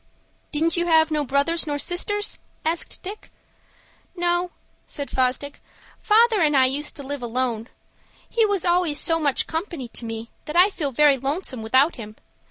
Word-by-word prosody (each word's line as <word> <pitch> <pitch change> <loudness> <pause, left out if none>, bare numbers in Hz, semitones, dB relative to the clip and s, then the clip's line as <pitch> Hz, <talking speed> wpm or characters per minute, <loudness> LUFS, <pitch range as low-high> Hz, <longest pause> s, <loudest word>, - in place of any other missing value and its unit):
"Didn't 320 +2 +1
you 345 0 +1
have 320 -1 +4
no 300 -1 +1
brothers 285 +5 0
nor 290 -1 -1
sisters?" 410 +7 -1 0.3
asked 330 +1 -2
Dick. 405 +3 -8 0.9
"No," 350 0 0 0.3
said 285 -1 -5
Fosdick; 260 +2 -1 0.4
"father 445 -1 +4
and 300 -3 +3
I 260 - +6
used 280 +3 -1
to 285 - -8
live 285 0 -5
alone. 240 -1 -2 0.6
He 460 - +1
was 405 -4 +1
always 350 -4 +2
so 330 0 +3
much 285 -4 +1
company 320 - -5
to 235 - -5
me 225 0 -6
that 300 - -6
I 365 +4 +6
feel 295 -7 -3
very 280 +1 +4
lonesome 270 -2 -3
without 260 +9 +2
him. 215 -2 -9
300 Hz, 165 wpm, -23 LUFS, 265-345 Hz, 0.9 s, I